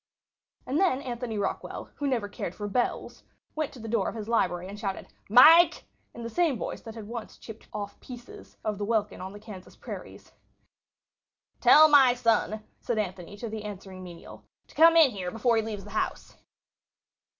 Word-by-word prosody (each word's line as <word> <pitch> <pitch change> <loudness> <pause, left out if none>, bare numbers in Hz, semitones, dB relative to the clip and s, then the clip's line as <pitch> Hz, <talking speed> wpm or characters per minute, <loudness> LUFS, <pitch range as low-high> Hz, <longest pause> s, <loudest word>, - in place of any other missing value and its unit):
And 275 +5 -1
then 360 -9 +2
Anthony 240 -3 -4
Rockwall, 205 - -4
who 290 - -2
never 240 -6 0
cared 185 -3 -6
for 205 - -5
bells, 240 +4 -2 0.3
went 310 -2 -3
to 260 - -12
the 225 - -8
door 230 +1 0
of - - -8
his 215 -2 -6
library 180 -6 0
and 200 +2 -9
shouted 195 -2 -4 0.2
"Mike!" 320 - +7 0.3
in 235 - -8
the - - -4
same 330 -5 +1
voice - - -5
that 225 -1 -10
had 220 -2 -8
once 230 -1 -7
chipped 225 -1 -12
off 205 -1 -6
pieces 245 -1 -12
of 210 -2 -3
the - - -2
welkin 210 -3 -1
on 190 +1 -6
the 205 - -11
Kansas 205 -4 -12
prairies. - - -10 1.3
"Tell 310 +1 +8
my 270 -5 +6
son," 225 -2 +1 0.2
said 235 - -3
Anthony 190 -1 -4
to 230 - -6
the 220 -1 -6
answering 190 -2 -8
menial, 175 -2 -12 0.3
"to - - -17
come 330 +1 +6
in 310 -5 +7
here 185 -4 -4
before 230 +4 +1
he - - +3
leaves 215 -2 -6
the 205 - -12
house." 215 - -3
220 Hz, 185 wpm, -27 LUFS, 205-250 Hz, 1.3 s, Tell